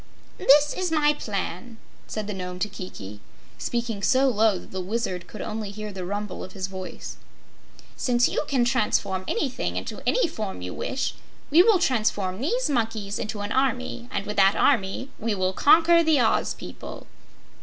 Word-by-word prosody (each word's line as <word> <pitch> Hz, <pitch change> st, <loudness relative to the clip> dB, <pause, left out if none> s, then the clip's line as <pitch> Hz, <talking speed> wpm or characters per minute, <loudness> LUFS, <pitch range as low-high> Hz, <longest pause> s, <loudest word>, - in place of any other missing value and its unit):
"This 295 Hz, +2 st, +5 dB
is 370 Hz, -2 st, -2 dB
my 300 Hz, -2 st, +4 dB
plan," 220 Hz, -, -4 dB, 0.3 s
said 215 Hz, -1 st, -4 dB
the 210 Hz, -, -4 dB
Nome 180 Hz, -1 st, -5 dB
to 195 Hz, -, 0 dB
Kiki, 105 Hz, -, -8 dB, 0.4 s
speaking 235 Hz, -4 st, -2 dB
so 265 Hz, +5 st, +4 dB
low 220 Hz, -4 st, +3 dB
that -, -, -12 dB
the 190 Hz, -, -3 dB
Wizard 185 Hz, -2 st, -3 dB
could -, -, -8 dB
only 215 Hz, -1 st, -4 dB
hear 210 Hz, 0 st, -6 dB
the 185 Hz, -1 st, -5 dB
rumble 205 Hz, 0 st, -4 dB
of 185 Hz, -, -9 dB
his 190 Hz, -1 st, -3 dB
voice. 190 Hz, -1 st, -7 dB, 0.8 s
"Since 245 Hz, -1 st, +2 dB
you -, -, -1 dB
can 255 Hz, -4 st, +2 dB
transform 210 Hz, -6 st, +1 dB
anything 260 Hz, +1 st, -1 dB
into -, -, -5 dB
any -, -, +3 dB
form 210 Hz, -, -5 dB
you 90 Hz, -, -5 dB
wish, 265 Hz, -, -2 dB, 0.4 s
we 325 Hz, +4 st, +8 dB
will 420 Hz, +1 st, +5 dB
transform 215 Hz, -, 0 dB
these 485 Hz, -, 0 dB
monkeys 220 Hz, -6 st, -1 dB
into 215 Hz, -2 st, -4 dB
an 205 Hz, +1 st, -4 dB
army, 255 Hz, -2 st, -1 dB
and 200 Hz, -, -2 dB
with 210 Hz, 0 st, -5 dB
that 195 Hz, 0 st, +5 dB
army 240 Hz, 0 st, +1 dB
we 220 Hz, -1 st, -1 dB
will 185 Hz, -1 st, 0 dB
conquer 335 Hz, -, +6 dB
the 315 Hz, -3 st, +4 dB
Oz 225 Hz, -2 st, +2 dB
people." -, -, -9 dB
220 Hz, 175 wpm, -25 LUFS, 195-265 Hz, 0.8 s, we